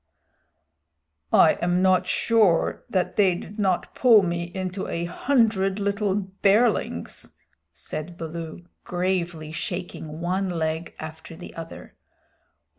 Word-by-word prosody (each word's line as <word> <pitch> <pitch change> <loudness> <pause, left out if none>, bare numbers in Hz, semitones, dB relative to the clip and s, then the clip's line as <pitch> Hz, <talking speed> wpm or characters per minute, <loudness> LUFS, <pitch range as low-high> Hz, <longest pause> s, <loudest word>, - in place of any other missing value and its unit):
"I 160 - +5
am 175 +1 +2
not 185 -1 +3
sure 215 -8 +2
that 185 -2 -1
they 190 -4 +4
did 205 +4 -9
not 190 -3 0
pull 230 -5 +6
me 170 -1 -1
into 185 +2 -4
a 170 +1 -2
hundred 210 -2 +1
little 200 -1 0
bearlings," 200 +3 +1 0.4
said 170 +3 -7
Baloo, 165 +1 -6 0.2
gravely 175 -3 -2
shaking 165 -2 -5
one 185 +3 -1
leg 160 -1 -2
after 160 +1 -8
the 175 - -10
other. 165 0 -9
180 Hz, 115 wpm, -25 LUFS, 170-195 Hz, 0.4 s, pull